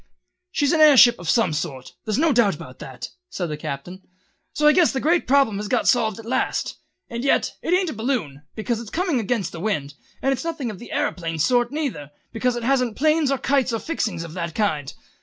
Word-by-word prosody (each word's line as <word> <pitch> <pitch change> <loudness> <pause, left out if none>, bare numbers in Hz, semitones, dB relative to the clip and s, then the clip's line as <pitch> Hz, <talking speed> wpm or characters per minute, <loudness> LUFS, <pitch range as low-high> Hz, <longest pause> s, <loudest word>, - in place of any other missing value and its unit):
"She's 290 -6 +1
an 315 - +3
air 300 -3 +8
ship 240 -4 +7
of 175 -2 -5
some 225 -9 +3
sort, 145 -5 -5
there's 215 0 -1
no 315 0 +3
doubt 210 -6 +3
about 130 -3 -11
that," 130 -4 -8 0.2
said 175 -3 -4
the 150 - -3
Captain, 150 +6 -6 0.5
"so 300 - -1
I 300 - +8
guess 345 +1 +4
the 265 - -2
great 335 +5 +1
problem 270 -6 +3
has 210 +1 -4
got 250 +2 0
solved 220 -5 +2
at 225 - -10
last. 250 +3 -1 0.3
And 235 +1 -5
yet 275 - +1
it - - -3
ain't 365 -3 0
a - - -6
balloon, 220 - -2
because 225 +1 -2
it's 230 - -9
coming 335 - 0
against 220 -4 -1
the 170 - -8
wind, 150 -8 -2 0.3
and 270 - +2
it's 265 - -4
nothing 315 -8 -3
of 195 - -10
the 240 - -11
æroplane 165 -3 -2
sort 240 - +2
neither, 275 - -3 0.2
because 245 +2 0
it 240 - -4
hasn't 250 -3 +1
planes 310 0 +2
or 275 - +1
kites 270 -1 +1
or - - 0
any 225 - -5
fixings 220 - -2
of 165 -2 -9
that 170 -2 -4
kind. 155 -10 -1
235 Hz, 230 wpm, -23 LUFS, 175-275 Hz, 0.5 s, air